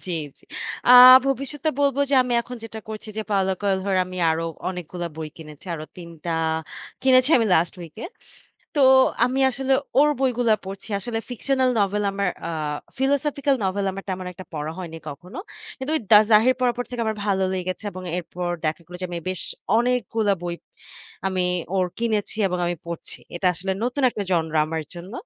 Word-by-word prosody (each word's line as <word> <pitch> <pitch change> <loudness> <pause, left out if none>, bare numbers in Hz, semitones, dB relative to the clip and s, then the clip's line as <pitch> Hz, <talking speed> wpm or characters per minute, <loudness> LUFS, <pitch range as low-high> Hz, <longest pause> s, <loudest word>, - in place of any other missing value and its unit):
জি, 180 - -3 0.3
জি। - - -29 0.5
আ - - +7 0.4
ভবিষ্যতে 275 +3 -1
বলব 280 -2 +2
যে - - +3
আমি 250 -1 -3
এখন 250 +1 -8
যেটা 225 -1 -7
করছি 220 0 -7
যে 220 - -1
Paulo 190 -2 +2
Coelho 195 -1 0
এর 190 - +3
আমি 185 - -8
আরো 160 +1 -1 0.2
অনেকগুলা 180 -1 -5
বই 160 -1 -5
কিনেছি। 155 0 -12
আরো 155 -1 -6
৩ 175 -2 -9 0.2
টা 170 - -2 0.7
কিনেছি 255 +1 +5
আমি 230 - +2
last 170 +1 +2
week 165 -2 -10
এ। - - -2 0.7
তো 290 - +1 0.4
আমি 255 +2 0
আসলে 265 +1 -1 0.3
ওর 295 +1 +6
বইগুলা 245 -4 +2
পড়ছি। 195 +3 -8
আসলে 225 +3 -3
fictional 260 +2 +1
novel 205 +1 +1
আমার 200 -1 -1 0.2
আ - - -3 0.5
philosophical 280 +1 +1
novel 195 +1 0
আমার 195 +1 -7
তেমন 185 -1 -3
একটা 185 +1 -10
পড়া 155 0 -4
হয়নি 170 -3 -6
কখনো। 175 - -9 0.4
কিন্তু 265 +2 -4
ওই - - 0
'The 210 - +9
Zahir' 225 +4 +5
পড়ার 250 -2 +2
পর 245 - -2
থেকে 245 -1 -4
আমার 220 - -1
ভালো 195 -2 +1
লেগেছে 185 +2 -4
এবং 185 - -8
এরপর 180 0 -4 0.2
দেখা 155 +2 -1
গেলো 180 +1 -9
যে 185 - -1
আমি 175 - -3
বেশ 185 -2 -3 0.4
অনেকগুলা 230 -3 +1
বই 175 -1 -3 0.7
আমি 190 -1 0 0.3
ওর 185 -1 +2
কিনেছি 220 -3 -1
এবং 180 0 -2
আমি 175 0 -1
পড়ছি। 170 -1 -6 0.2
এটা 180 +2 -1
আসলে 190 +3 -3
নতুন 255 +3 -1
একটা 210 - -4
genre 160 -3 0
আমার 160 0 -3
জন্য। 175 +3 -9
195 Hz, 185 wpm, -23 LUFS, 180-245 Hz, 0.7 s, The